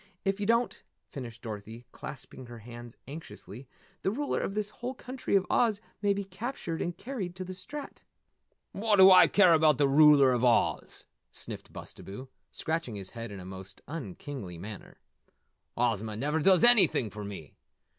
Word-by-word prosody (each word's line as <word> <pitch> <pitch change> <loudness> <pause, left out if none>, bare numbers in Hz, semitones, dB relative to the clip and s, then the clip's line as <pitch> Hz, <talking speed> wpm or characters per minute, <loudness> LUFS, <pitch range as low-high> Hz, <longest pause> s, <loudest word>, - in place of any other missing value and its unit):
If 195 +1 0
you 205 - -2
don't," 235 +1 +1 0.3
finished 120 -5 -8
Dorothy, 110 +1 -7
clasping 130 -1 -9
her 120 0 -9
hands 120 +1 -11
anxiously, 135 -5 -10 0.3
"the - - +1
ruler 280 +8 -1
of 195 - -3
this 210 0 -2
whole 245 +4 -6
country 255 -3 -3
of 190 -1 +3
Oz 220 -4 +2 0.2
may 205 -1 +2
be 200 0 -1
captured 190 -3 -5
and 175 0 -3
carried 205 -9 -5
to 185 - -5
the 185 0 -7
Strat." 275 +11 -9 0.7
"What 210 +1 +1
do 190 -1 +9
I 185 -1 +9
care 185 -4 +5
about 155 -3 +4
the 140 - +3
Ruler 145 -1 +7
of 125 -1 0
Oz?" 120 -2 +1 0.3
sniffed - - -8
Bustabo, 130 +7 -9 0.2
scratching 160 -8 -3
his 95 -2 -7
head 115 -2 -7
in 100 - -7
a 90 - -9
most 95 +1 -9
unkingly 130 - -7
manner. 100 +4 -9 0.8
"Ozma 110 -3 0
never 150 +7 -1
does 185 +5 +4
anything 215 - +5
for 105 +1 -7
me! 100 -7 -8
150 Hz, 165 wpm, -29 LUFS, -, 0.8 s, do